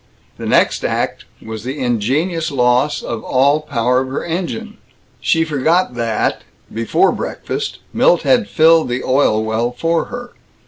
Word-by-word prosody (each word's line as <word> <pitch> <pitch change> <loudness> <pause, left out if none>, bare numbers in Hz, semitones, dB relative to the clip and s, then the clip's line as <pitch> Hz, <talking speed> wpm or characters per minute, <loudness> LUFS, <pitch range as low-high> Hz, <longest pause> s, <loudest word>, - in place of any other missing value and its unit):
The - - -5
next - - +2
act - - -2 0.2
was 110 -1 -6
the 130 +4 -4
ingenious 140 - 0
loss 125 +1 +1
of 115 -2 -5
all 140 +3 +3
power 125 -4 +1
of 130 - -4
her 130 - -4
engine. 190 +6 -4 0.4
She 165 -1 +2
forgot 155 +2 +1
that, 115 -2 -1 0.3
before 115 - +2
breakfast, 420 0 -4 0.2
Milt - - +3
had 240 -5 +2
filled 160 -1 +4
the 125 +1 -2
oil 130 -5 +2
well 110 +2 -1
for 165 +6 0
her. 245 0 -8
140 Hz, 145 wpm, -17 LUFS, 120-165 Hz, 0.4 s, filled